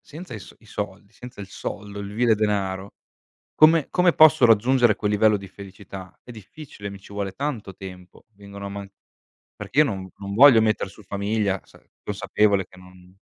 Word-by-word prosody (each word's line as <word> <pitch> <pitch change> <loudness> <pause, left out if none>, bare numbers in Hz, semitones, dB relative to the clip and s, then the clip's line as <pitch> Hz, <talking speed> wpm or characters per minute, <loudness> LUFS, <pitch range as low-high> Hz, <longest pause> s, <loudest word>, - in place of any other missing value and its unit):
Senza 155 -2 -10
i 110 - -6
s 95 - -14
i - - -22
soldi, - - -7
senza 125 -4 -11
il 100 - -8
soldo, 100 +1 -7
il 100 0 -6
vile 115 +2 +2
denaro, 100 -2 -2 0.6
come 155 -1 +5
come 180 -1 +3
posso 155 -4 +6
raggiungere 120 0 +4
quel 105 - -1
livello 105 +1 +3
di 100 -1 -9
felicità? 95 -1 -11
È - - -14
difficile, 110 0 -10
mi 100 0 -9
ci 100 - -16
vuole 100 -1 -4
tanto 120 -6 -4
tempo, 90 -1 -12
vengono 100 0 -11
a - - -4
man 100 0 -8 0.7
perché 135 - -6
io - - +7
non 95 -6 -5
non 100 0 -6
voglio 130 0 +8
metter 105 -3 0
su 105 - -16
famiglia 100 0 -1
sa - - -21 0.2
consapevole 100 -1 +1
che - - -19
non 90 0 -18
100 Hz, 185 wpm, -23 LUFS, 95-115 Hz, 0.7 s, voglio